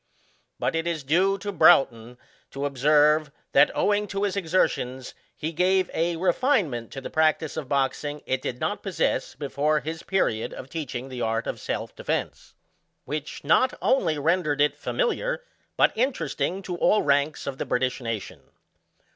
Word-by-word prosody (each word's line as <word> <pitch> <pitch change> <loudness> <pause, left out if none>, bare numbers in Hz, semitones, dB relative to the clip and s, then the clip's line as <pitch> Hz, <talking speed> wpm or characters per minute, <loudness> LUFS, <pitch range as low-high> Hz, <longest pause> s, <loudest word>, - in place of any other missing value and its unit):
But - - -1
it 165 +1 -1
is 165 -4 -2
due 185 +8 +2
to 205 +1 -5
Broughton 125 - +4 0.3
to 140 +1 -4
observe, 150 +2 +3 0.2
that, 140 +2 +6
owing 210 0 +1
to 200 0 -3
his 200 -1 0
exertions, 155 -8 -1 0.2
he 160 - -3
gave 185 +2 +2
a 170 +1 0
RtiFiNgMENT 175 - +1
to 135 - -7
the - - -7
practice 160 0 +1
of 150 -5 -5
boxing 145 +1 -1
it 130 - -1
did 125 - -4
not - - -2
possess - - -1
before 150 +1 0
his 160 +4 -5
period 115 - -1
of 130 - -10
teaching 135 -5 -5
the 125 -2 -6
art 115 0 -1
of - - -4
se!f - - -4
defence, - - -4 0.5
which 150 +2 -5
not 165 - +3
only 170 - +2
rendered 150 -1 +1
it 145 0 +3
familiar, - - -1 0.3
but - - +4
interesting 190 - -1
to 180 -2 -4
all 210 - +3
ranks 145 +1 +1
of 135 -1 -5
the - - -2
British 125 +1 0
nation. 115 -4 -5
150 Hz, 160 wpm, -25 LUFS, 135-180 Hz, 0.5 s, that